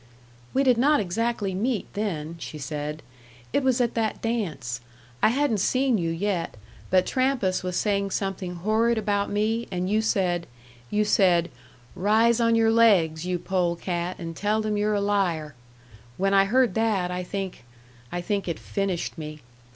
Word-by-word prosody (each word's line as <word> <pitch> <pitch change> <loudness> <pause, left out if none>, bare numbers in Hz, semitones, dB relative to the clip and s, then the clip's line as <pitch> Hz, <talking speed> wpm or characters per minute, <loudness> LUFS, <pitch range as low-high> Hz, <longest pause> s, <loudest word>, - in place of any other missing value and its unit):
"We 270 - +2
did 250 -3 +4
not 290 +3 +4
exactly 205 +1 -1
meet, 220 +3 -1
then," 170 -7 -3
she 155 - -7
said. 150 +1 -5 0.5
"It - - +3
was 260 -1 +2
at 240 -2 +1
that 225 -2 -1
dance. 155 - -3 0.4
I - - +5
hadn't 255 -3 +1
seen 255 +2 +2
you 165 -1 -1
yet; 175 - -2 0.3
but 185 0 +4
Trampas 255 -8 +1
was 180 -1 -3
saying 200 -1 +1
something 190 -2 -3
horrid 220 +6 +1
about 205 -1 0
me, 220 +3 0
and 180 -1 -2
you 215 +1 +3
said 180 -5 0 0.4
you 210 0 +1
said, 180 -5 +3 0.4
'Rise 220 +4 +3
on 230 0 +3
your 225 -1 +4
legs, 180 -8 +4
you 180 -1 0
pole 175 -1 0
cat, 175 0 -3
and 165 -2 -6
tell 210 +4 0
them 215 -1 -1
you're 210 0 +1
a 200 - +1
liar.' 180 -7 0 0.6
When 195 +1 +1
I 195 0 +5
heard 245 +1 +3
that, 205 -5 +1
I 180 0 -2
think 190 -5 -5 0.5
I 175 - -2
think 200 +1 -2
it 170 - -2
finished 190 -3 -3
me." 155 -1 -7
200 Hz, 165 wpm, -25 LUFS, 175-225 Hz, 0.6 s, I